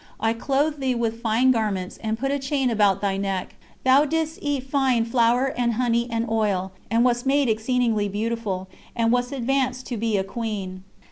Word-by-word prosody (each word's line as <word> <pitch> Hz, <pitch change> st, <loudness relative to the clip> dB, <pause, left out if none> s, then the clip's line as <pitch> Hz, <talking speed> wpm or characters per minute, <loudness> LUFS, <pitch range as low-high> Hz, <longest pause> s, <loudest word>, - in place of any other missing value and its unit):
I 225 Hz, +1 st, +1 dB
clothed 280 Hz, +5 st, 0 dB
thee 260 Hz, -2 st, 0 dB
with 230 Hz, -1 st, -2 dB
fine 235 Hz, +3 st, +3 dB
garments, 205 Hz, -6 st, -1 dB
and 220 Hz, 0 st, -3 dB
put 270 Hz, +3 st, -1 dB
a 285 Hz, -, 0 dB
chain 270 Hz, -2 st, 0 dB
about 205 Hz, -3 st, +3 dB
thy 195 Hz, -1 st, 0 dB
neck. 195 Hz, -2 st, -3 dB, 0.3 s
Thou 265 Hz, +2 st, +6 dB
didst 320 Hz, +1 st, -2 dB
eat 285 Hz, -3 st, -1 dB
fine 265 Hz, -4 st, +1 dB
flour 240 Hz, +3 st, +2 dB
and 240 Hz, -1 st, +1 dB
honey 235 Hz, 0 st, +1 dB
and 230 Hz, 0 st, -1 dB
oil, 205 Hz, -4 st, 0 dB, 0.2 s
and 230 Hz, +2 st, +3 dB
wast 245 Hz, +1 st, +1 dB
made 280 Hz, 0 st, +3 dB
exceedingly 225 Hz, -2 st, +1 dB
beautiful, 210 Hz, -2 st, -3 dB, 0.3 s
and 230 Hz, -1 st, +2 dB
wast 245 Hz, 0 st, +1 dB
advanced 260 Hz, -1 st, -1 dB
to 240 Hz, -, -4 dB
be 220 Hz, -1 st, 0 dB
a 190 Hz, -, +1 dB
queen." 195 Hz, -4 st, -5 dB
235 Hz, 185 wpm, -24 LUFS, 215-260 Hz, 0.3 s, Thou